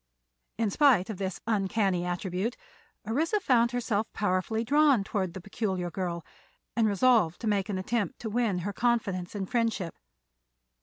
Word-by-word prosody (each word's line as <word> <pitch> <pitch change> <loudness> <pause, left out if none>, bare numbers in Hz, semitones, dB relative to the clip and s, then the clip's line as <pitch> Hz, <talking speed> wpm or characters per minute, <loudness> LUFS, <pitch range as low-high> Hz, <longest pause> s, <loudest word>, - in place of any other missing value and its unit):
In 220 -2 0
spite 235 -7 +4
of 205 - -6
this 190 -2 -3
uncanny 195 -4 +1
attribute, 185 +5 -2 0.5
Orissa 320 - +1
found 240 - +3
herself 230 -3 -1
powerfully 205 +3 0
drawn 285 -3 +4
toward 190 -4 -2
the 190 - -6
peculiar 190 -3 -3
girl, 170 -2 -3 0.5
and 225 -2 +3
resolved 205 -4 +3
to - - -4
make 205 -1 +1
an 195 - -1
attempt 205 0 -1
to 225 - -3
win 225 -4 +1
her 205 - -2
confidence 210 -6 0
and 195 -2 -3
friendship. 225 -7 -1
205 Hz, 150 wpm, -28 LUFS, 185-235 Hz, 0.5 s, spite